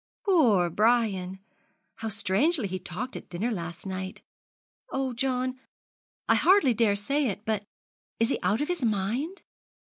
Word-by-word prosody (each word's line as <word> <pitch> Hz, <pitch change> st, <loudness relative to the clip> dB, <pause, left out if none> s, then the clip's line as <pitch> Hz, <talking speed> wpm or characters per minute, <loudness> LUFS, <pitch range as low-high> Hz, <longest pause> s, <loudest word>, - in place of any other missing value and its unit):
'Poor 230 Hz, -, +4 dB
Brian! 205 Hz, -3 st, +2 dB, 0.6 s
How 225 Hz, -, -4 dB
strangely 220 Hz, -, +2 dB
he 185 Hz, 0 st, -4 dB
talked 215 Hz, +10 st, -5 dB
at -, -, -8 dB
dinner 205 Hz, +8 st, -2 dB
last 170 Hz, -4 st, -5 dB
night! 190 Hz, 0 st, -5 dB, 0.7 s
Oh, 265 Hz, -1 st, -1 dB
John, 255 Hz, 0 st, -1 dB, 0.7 s
I -, -, +5 dB
hardly 370 Hz, -9 st, +5 dB
dare 220 Hz, -2 st, +3 dB
say 275 Hz, +8 st, 0 dB
it 205 Hz, 0 st, -4 dB
but 215 Hz, -2 st, 0 dB, 0.6 s
is 230 Hz, +1 st, +3 dB
he -, -, 0 dB
out 200 Hz, +7 st, +1 dB
of 295 Hz, -, 0 dB
his 355 Hz, -6 st, -2 dB
mind?' 235 Hz, -, -1 dB
225 Hz, 145 wpm, -27 LUFS, 190-260 Hz, 0.7 s, I